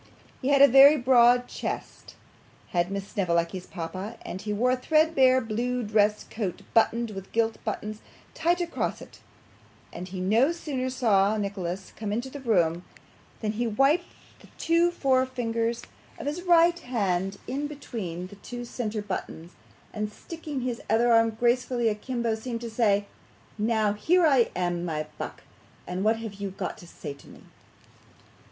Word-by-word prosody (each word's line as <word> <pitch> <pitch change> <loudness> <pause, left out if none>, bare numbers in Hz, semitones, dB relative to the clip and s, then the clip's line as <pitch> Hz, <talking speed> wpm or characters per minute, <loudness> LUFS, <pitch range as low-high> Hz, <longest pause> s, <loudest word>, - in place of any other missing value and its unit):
He 260 - -2
had 280 0 +6
a - - +10
very 275 +3 +8
broad 245 -1 +5
chest - - -6 0.5
had 175 0 0
Miss 200 0 -4
Snevellicci's 180 -1 -1
papa, 185 +5 -6
and 185 - -6
he 210 +1 -4
wore 240 +5 +2
a - - +3
threadbare 270 -2 +4
blue 245 +2 -2
dress 210 0 +2
coat 205 -6 -5
buttoned 230 0 +2
with 195 -1 -8
gilt 225 0 0
buttons 215 0 -4 0.3
tight 345 +2 +1
across 345 -1 -2
it; - - -13 0.7
and 180 +2 -6
he 190 0 -6
no 220 - +3
sooner 280 -7 -3
saw 215 -5 +2
Nicholas 195 -2 -4
come 215 -2 -4
into 240 +5 -3
the 285 - -7
room, 175 -9 +1 0.6
than 215 -2 0
he 235 +3 -1
whipped 275 +10 +2 0.3
the - - -17
two 335 +1 +3
forefingers 250 -6 0 0.3
of - - -7
his 300 +5 -2
right 345 -1 +4
hand 195 - -1
in 285 +3 -3
between 220 - -6
the 200 +2 -12
two 245 +4 -7
centre 220 -3 -4
buttons, 180 -4 -6 0.4
and 210 -1 -3
sticking 300 +1 -6
his 245 -1 -3
other 235 +2 +4
arm 225 0 +5
gracefully 240 +1 +1
a - - +1
kimbo 235 +1 -2
seemed 230 +1 -4
to 235 -1 -6
say, 205 -3 +2 0.5
'Now, 215 -1 +2
here 345 - +3
I 270 -6 +4
am, 175 -1 -1
my 155 -3 -2
buck, - - -6 0.4
and 180 +2 -3
what 220 +2 +3
have 225 -2 -6
you 200 0 -5
got 190 - -5
to 175 - -13
say 150 -3 -7
to 140 - -18
me? - - -14
225 Hz, 160 wpm, -27 LUFS, 200-255 Hz, 0.7 s, a